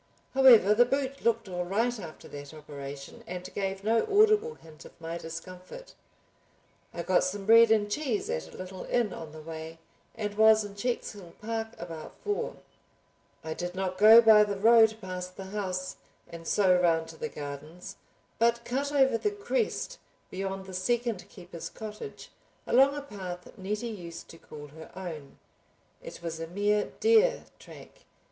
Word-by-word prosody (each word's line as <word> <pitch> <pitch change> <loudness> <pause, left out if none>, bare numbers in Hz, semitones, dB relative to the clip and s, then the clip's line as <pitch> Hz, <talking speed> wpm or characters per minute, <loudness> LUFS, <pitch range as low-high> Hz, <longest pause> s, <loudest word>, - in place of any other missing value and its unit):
However, 245 -7 +7
the 235 +3 +6
boot 275 +2 -2
looked 230 -2 +1
all 180 -1 -3
right 225 +6 0
after 165 -5 -10
that 145 +1 -9
operation 140 -2 -9
and 180 +1 -6
gave 195 -1 -3
no 225 +2 +3
audible 430 +2 +4
hint 155 -1 -15
of - - -16
my 165 +1 -5
discomfort. 180 - -9 1.0
I 170 - -5
got 185 - +3
some 195 +2 -3
bread 230 +1 +7
and 215 -2 +3
cheese 230 0 -2
at 80 0 -4
a - - -12
little 185 0 -7
inn 235 -5 0
on 160 -2 -8
the 155 0 -11
way, 160 0 -8 0.4
and 210 -1 -3
was 220 0 +5
in 205 - -9
Checkshill 205 -4 -4
park 225 +1 -4
about 165 -2 -8
four. 415 -1 -2 0.9
I 160 - -4
did 175 +2 -5
not 185 -1 -3
go 220 +3 +9
by 215 -2 +8
the 205 -1 -2
road 220 +1 +6
past 185 -1 -6
the 195 - -6
house 185 -3 -3 0.3
and 165 -1 -10
so 190 -3 +4
round 165 -2 +2
to 160 - -11
the 230 - -4
gardens, 150 +6 -8 0.4
but 235 +1 +2
cut 275 +4 -2
over 265 -5 +3
the 420 - +1
crest 435 +4 -2 0.3
beyond 195 0 -4
the 190 - -10
second 230 +2 -1
keeper's 175 -2 -9
cottage, 215 - -9 0.3
along 270 +3 +4
a 290 - -5
path 185 -8 -8
Nettie 210 +5 -3
used 175 -6 -8
to 165 - -13
call 150 -1 -11
her 160 +2 -12
own. 165 -7 -8 0.6
It - - -10
was 165 -1 -4
a 165 - -5
mere 205 +4 0
deer 455 +3 +4 0.2
track. - - -14
195 Hz, 165 wpm, -29 LUFS, 170-230 Hz, 1.0 s, go